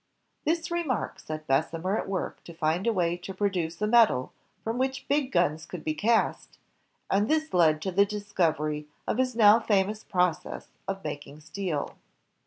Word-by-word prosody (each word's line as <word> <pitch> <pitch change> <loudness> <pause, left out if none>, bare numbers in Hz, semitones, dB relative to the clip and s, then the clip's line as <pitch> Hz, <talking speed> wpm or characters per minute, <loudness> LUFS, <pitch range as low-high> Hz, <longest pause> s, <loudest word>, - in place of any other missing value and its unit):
This 330 +2 0
remark 340 -7 -1
set 155 0 -6
Bessemer 165 +7 0
at - - -3
work 190 -2 -3
to 170 - -10
find 160 +5 0
a - - +4
way 175 -4 +1
to 185 +2 -8
produce 180 -5 -1
a - - +4
metal 215 - +4 0.3
from 225 +2 -2
which 265 +1 -1
big 280 -2 +1
guns 160 -3 +1
could 180 -4 -7
be 155 - 0
cast, 220 +9 0 0.5
and 205 +3 +2
this 315 0 +1
led 155 -3 +4
to 190 - -1
the 200 +3 +5
discovery 160 -8 -1 0.2
of 235 - -1
his 255 -2 +1
now 215 -1 +7
famous 210 -1 +1
process 180 -3 -1 0.2
of 195 0 -3
making 145 0 -6
steel. 160 -2 -4
190 Hz, 170 wpm, -28 LUFS, 160-225 Hz, 0.5 s, now